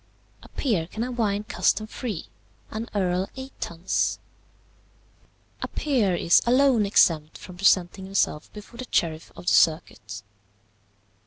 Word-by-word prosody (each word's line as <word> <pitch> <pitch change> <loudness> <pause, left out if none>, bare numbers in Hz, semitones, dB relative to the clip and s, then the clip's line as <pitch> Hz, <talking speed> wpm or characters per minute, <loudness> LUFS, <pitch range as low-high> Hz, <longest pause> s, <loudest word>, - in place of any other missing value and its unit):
"A - - -15
peer 200 - -1
can 220 +5 -4
have 245 -1 -5
wine 205 -2 +1
custom 215 0 +1
free; 220 -4 -5 0.5
an 220 +2 -5
earl 185 -1 0
eight 265 0 -8
tuns. 170 +2 -1 1.4
"A - - -2
peer 235 -11 0
is 170 0 +4
alone 250 -4 +4
exempt 155 -6 +3
from 180 - -11
presenting 190 0 +2
himself 190 -5 -1
before 210 +3 -12
the 255 - -6
sheriff 160 -1 -1
of - - -11
the - - +2
circuit. 110 - +1
195 Hz, 135 wpm, -25 LUFS, 170-230 Hz, 1.4 s, is